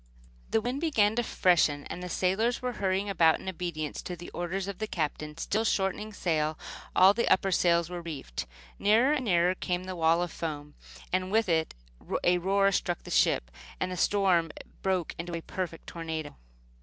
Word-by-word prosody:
The 225 - +2
wind 250 +5 -3
began 220 -10 +2
to - - +4
freshen, 165 -9 +2
and 180 - -6
the 180 - -5
sailors 200 +8 +1
were 250 0 -2
hurrying 190 +1 +1
about 165 -5 +4
in - - -11
obedience 170 -4 -4
to 180 - -5
the 175 0 -10
orders 185 +2 -3
of 200 -2 -6
the 215 - -2
Captain, 150 -3 -3
still 215 +6 0
shortening 210 0 0
sail. 155 -5 -1 0.4
All 190 +2 +7
the 235 - 0
upper 195 - +3
sails 170 -2 +3
were 175 0 -6
reefed. 145 - -6 0.3
Nearer 230 +8 +4
and 275 -4 -1
nearer 175 -2 +3
came 180 -1 -2
the 185 0 -5
wall 165 +1 +3
of 175 - -4
foam, 150 -3 -5 0.4
and 185 0 0
with 220 0 +3
a 160 - -1
roar 195 +2 +2
it - - -3
struck 175 -2 -1
the - - -9
ship, - - +2 0.3
and 185 - -1
the - - -3
storm 180 -3 +2 0.3
broke 185 -3 0
in 170 +1 -4
a - - -2
perfect 165 -1 -5
tornado. 160 -2 -5
180 Hz, 185 wpm, -29 LUFS, 165-195 Hz, 0.4 s, All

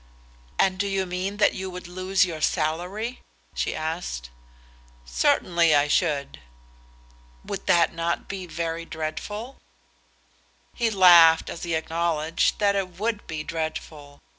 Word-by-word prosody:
"And 185 -1 +2
do 200 - 0
you 195 -1 0
mean 185 +3 -3
that 210 - +4
you 190 0 -5
would 180 -1 -8
lose 185 +1 +1
your 165 -4 -6
salary?" 180 +11 -1 0.3
she - - -2
asked. 155 - -4 0.7
"Certainly 155 - +2
I 145 0 +3
should." 140 -1 0 1.1
"Would - - -6
not 170 -1 +3
that 170 +1 -2
be 190 -2 -6
very 165 0 -3
dreadful?" 170 +10 -6 1.2
He 235 -2 0
laughed 175 -5 +7
as - - -8
he 170 -2 -2
acknowledged 165 0 0
that 200 -1 +2
it 185 -3 -3
would 220 0 -2
be 155 -1 -4
dreadful. 155 -2 -6
170 Hz, 130 wpm, -25 LUFS, 160-190 Hz, 1.2 s, laughed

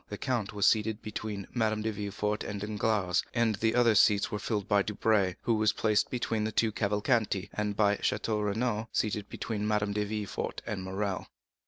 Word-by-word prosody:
The 105 - -5
count 120 -6 -1
was 100 -2 0
seated 110 0 +2
between 105 -2 -5
Madame 110 -3 0
de 110 - 0
Villefort 105 0 -2
and 100 0 -4
Danglars; 105 -2 0
the 110 -1 +2
other 120 -2 +5
seats 100 -1 +4
were 105 - -2
filled 105 -1 -2
by 100 0 +4
Debray, 100 -2 +1
who 115 - +2
was 110 -1 +3
placed 105 -2 +1
between 115 -3 -1
the 110 - -1
two 110 0 +2
Cavalcanti, 105 -1 0
and 105 -1 -2
by 105 -1 +3
Château 105 0 -1
Renaud, 110 +1 -1
seated 105 -1 -1
between 105 -2 -3
Madame 105 -1 +1
de 105 0 0
Villefort 105 -1 -4
and 100 -3 -3
Morrel. 95 0 -3
105 Hz, 180 wpm, -30 LUFS, 100-110 Hz, -, other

